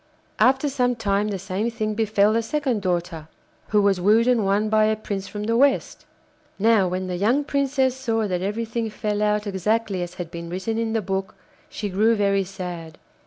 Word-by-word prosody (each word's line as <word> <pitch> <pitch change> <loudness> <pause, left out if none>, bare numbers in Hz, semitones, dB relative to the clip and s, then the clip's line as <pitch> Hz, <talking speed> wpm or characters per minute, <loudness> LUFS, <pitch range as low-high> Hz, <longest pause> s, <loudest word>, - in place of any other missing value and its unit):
After 265 +3 +4
some 250 -3 +1
time 205 -2 0
the 205 -2 -2
same 195 +4 -2
thing 215 -2 -2
befell 215 -1 +2
the 230 - +2
second 255 -2 -1
daughter, 175 -4 -2 0.4
who 210 -1 +2
was 195 -2 +2
wooed 220 +5 +4
and 245 -4 +3
won 200 +2 +1
by 215 0 +3
a 215 0 +2
prince 200 -2 -5
from 210 -1 -6
the 230 +2 0
West. 275 +3 +1 0.5
Now 215 -2 +3
when 185 +1 -2
the 180 -1 -3
young 235 +10 +2
Princess 275 -2 0
saw 225 -4 -1
that 180 -2 -2
everything 225 +3 -2
fell 210 0 -3
out 210 0 +1
exactly 200 0 -1
as 175 0 -5
had 170 -2 -6
been 170 -1 -7
written 190 +6 -3
in 225 -1 -1
the 225 -2 0
book, 190 +1 -3 0.3
she 210 - -4
grew 215 +4 +2
very 200 -1 +2
sad. 175 -4 -7
210 Hz, 195 wpm, -23 LUFS, 190-230 Hz, 0.5 s, After